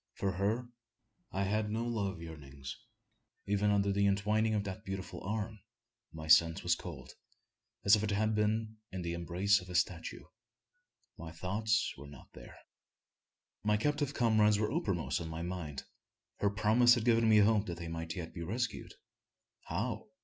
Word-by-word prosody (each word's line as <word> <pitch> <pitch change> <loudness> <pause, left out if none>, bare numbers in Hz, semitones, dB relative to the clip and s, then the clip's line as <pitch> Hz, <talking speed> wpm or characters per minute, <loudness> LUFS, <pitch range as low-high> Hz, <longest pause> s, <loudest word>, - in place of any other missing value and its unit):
For 95 - -1
her 105 +7 -1 0.6
I 95 - -1
had 105 +2 0
no 115 +2 -1
love 100 -7 -2
yearnings. 70 -4 -8 0.7
Even 100 +1 +1
under 100 -1 +2
the 100 0 +2
entwining 105 +2 +2
of 105 - 0
that 95 -2 -6
beautiful 95 0 -6
arm, 110 +2 -3 0.5
my 80 0 -8
sense 80 +1 +5
was 90 - 0
as - - +6
cold, 75 -8 -9 0.7
as 100 - +8
if 105 0 -1
I - - +1
had 110 +1 +1
been 110 +1 0
in 95 -2 -4
the 85 0 -2
embrace 90 +4 +2
of 90 - -12
a 90 - -6
statue. 85 0 -1 1.0
My 85 -1 -7
thoughts 105 +6 0
were 70 - -9
not 70 - -14
there. - - -12 1.1
My 105 0 +3
captive 145 +4 0
comrades 110 -3 +4
were 105 0 0
uppermost - - -1
in 80 - -5
my 80 +1 -5
mind. 85 -6 -5 0.5
Her 100 - +2
promise 110 +4 +5
had 120 -2 -2
given 115 -1 +4
me 110 - +6
hope 105 0 +4
that 85 -2 -4
they 85 0 -6
might 80 0 -4
yet 85 -3 -6
be 85 - -6
rescued. 115 +8 -3 0.7
How? - - -3
100 Hz, 170 wpm, -33 LUFS, 85-110 Hz, 1.1 s, as